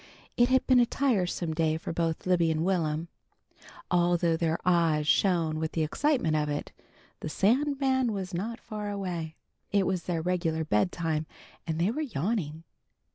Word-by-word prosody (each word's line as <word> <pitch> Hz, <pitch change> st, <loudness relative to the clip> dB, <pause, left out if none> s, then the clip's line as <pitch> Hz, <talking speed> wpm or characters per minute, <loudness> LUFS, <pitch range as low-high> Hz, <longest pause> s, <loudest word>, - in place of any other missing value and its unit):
It 240 Hz, +1 st, +4 dB
had 260 Hz, 0 st, +3 dB
been 255 Hz, -1 st, +5 dB
a 240 Hz, -, +5 dB
tiresome 185 Hz, -, 0 dB
day 160 Hz, -1 st, +1 dB
for 165 Hz, -, -5 dB
both 165 Hz, -1 st, -1 dB
Libby 175 Hz, -3 st, +3 dB
and 160 Hz, +1 st, 0 dB
Will'm. 165 Hz, -3 st, 0 dB, 0.8 s
Although 175 Hz, -1 st, +3 dB
their 160 Hz, 0 st, 0 dB
eyes 165 Hz, -4 st, +3 dB
shone 165 Hz, -3 st, +2 dB
with 160 Hz, 0 st, -3 dB
the 160 Hz, -, +1 dB
excitement 205 Hz, -, +1 dB
of 150 Hz, -1 st, 0 dB
it, 145 Hz, 0 st, -3 dB, 0.5 s
the -, -, -5 dB
Sandman 260 Hz, -, +2 dB
was 190 Hz, -3 st, -4 dB
not 220 Hz, +7 st, -3 dB
far 210 Hz, -1 st, -6 dB
away. 175 Hz, -6 st, -4 dB, 0.4 s
It 200 Hz, -2 st, +3 dB
was 185 Hz, -2 st, -1 dB
their 165 Hz, -3 st, -2 dB
regular 165 Hz, -3 st, 0 dB
bedtime, 155 Hz, +5 st, 0 dB, 0.4 s
and 160 Hz, -1 st, -1 dB
they 180 Hz, +5 st, +2 dB
were 295 Hz, +6 st, -3 dB
yawning. 175 Hz, -, -2 dB
175 Hz, 160 wpm, -28 LUFS, 160-205 Hz, 0.8 s, been